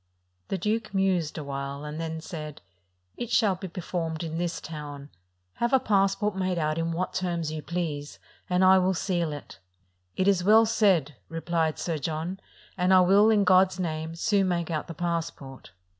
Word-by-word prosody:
The 195 - -2
duke 215 +2 -2
mused 185 -6 +1
awhile, 140 -1 -5
and 150 +2 -5
then 160 -1 -4
said: 155 -4 -8 0.5
"It 240 - -4
shall 215 -5 +3
be 190 +1 -6
performed 165 -2 -4
in 165 0 -4
this 175 -1 -2
town: 145 -2 -8 0.5
have 235 +2 0
a 265 - +6
passport 200 -1 +1
made 185 -1 -1
out 155 0 0
in 165 0 -1
what 180 +2 -2
terms 170 -4 -2
you 155 -1 -4
please, 155 -4 -4 0.3
and 180 +1 +2
I 190 0 +7
will 185 +1 +1
seal 170 -3 -1
it." 145 -9 -9 0.6
"It 185 - +1
is 190 -3 +3
well 220 +4 +6
said," 185 - +2
replied 165 -1 -1
Sir 165 -3 -2
John; 160 +6 -3 0.4
"and 180 +1 +4
I 185 - +7
will, 200 +4 +5
in 210 -2 +4
God's 185 0 +4
name, 160 -2 -3
soon 195 +2 +2
make 170 -2 -1
out 155 -2 -2
the 165 - -7
passport." 165 -6 -4
175 Hz, 175 wpm, -27 LUFS, 155-190 Hz, 0.6 s, I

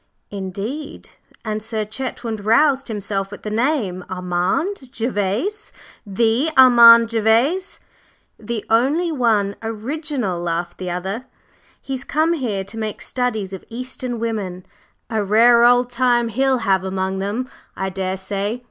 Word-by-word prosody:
"Indeed!" 205 +9 -6 0.4
and 215 0 -2
Sir 220 -1 -3
Chetwynd 225 -1 -5
roused 275 +5 +3
himself 200 -3 -3
at 205 - -10
the 210 - -4
name 220 - 0
"Armand 185 - -2
Gervase! 235 - -2 0.4
The 230 +8 +1
Armand 235 -3 +8
Gervase?" 230 - +1 0.6
"The 220 0 -4
only 285 +10 +2
one 220 -8 +1
original," 230 - -3
laughed 170 0 -3
the 185 -1 -4
other. 190 +7 -4 0.5
"He's 265 -1 -4
come 315 +4 +1
here 230 -11 -2
to 210 +4 -8
make 215 -1 -4
studies 220 -6 -2
of 190 - -7
Eastern 250 0 -5
women. 205 -6 -4 0.5
A 220 -2 0
rare 235 +4 +5
old 245 +1 +4
time 240 -1 +2
he'll 265 +3 +1
have 190 -1 +2
among 190 0 -2
them, 210 +6 -2 0.3
I 190 0 -2
daresay! 195 +3 -3
225 Hz, 130 wpm, -20 LUFS, 195-255 Hz, 0.6 s, Armand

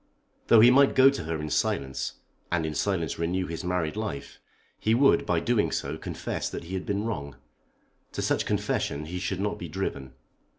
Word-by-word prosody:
Though 115 -2 +7
he 120 +2 +8
might 140 +2 +5
go 135 +1 +7
to 135 - -5
her 80 -1 -2
in 75 0 -4
silence, 65 -1 -1 0.4
and 85 -2 +1
in 80 - -3
silence 85 -3 -1
renew 90 +3 0
his 85 +1 -5
married 90 -3 -1
life, 105 -10 -5 0.4
he 110 +1 +2
would 135 -2 +4
by 85 -4 +2
so - - -2
doing 120 -3 +2 0.3
confess - - -4
that - - -6
he 85 +3 -8
had 95 -1 -3
been 100 +1 -1
wrong. 70 - -4 0.8
To - - -3
such - - 0
confession 75 +2 -1
he 90 +3 -5
should 95 0 -2
not 105 +1 -2
be 85 - -5
driven. 70 -7 -4
90 Hz, 195 wpm, -27 LUFS, 80-105 Hz, 0.8 s, he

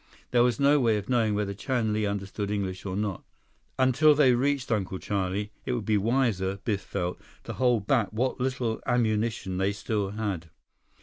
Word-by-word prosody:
There 120 - +4
was 120 -2 +2
no 140 +1 +5
way 115 -4 +3
of 100 +2 -6
knowing 115 -4 +2
whether 105 -1 -1
Chan 115 0 -1
Li 105 -1 0
understood 100 0 -3
English 100 -2 -3
or 95 - -3
not. 100 -2 -2 0.5
Until 135 +4 +5
they 140 -4 +5
reached 135 +1 0
Uncle 95 -4 -1
Charlie, 100 +1 -2
it 125 - -2
would 120 -4 -3
be 110 - +2
wiser, 105 -3 +1
Biff 100 -3 -1
felt, 90 0 -4 0.2
to - - -6
hold 120 -5 +1
back 115 -5 +2
what 125 +4 -1
little 125 -3 -1
ammunition 110 -5 0
they 95 +1 +2
still 105 -1 -2
had. 100 -6 -4
110 Hz, 180 wpm, -27 LUFS, 100-125 Hz, 0.5 s, no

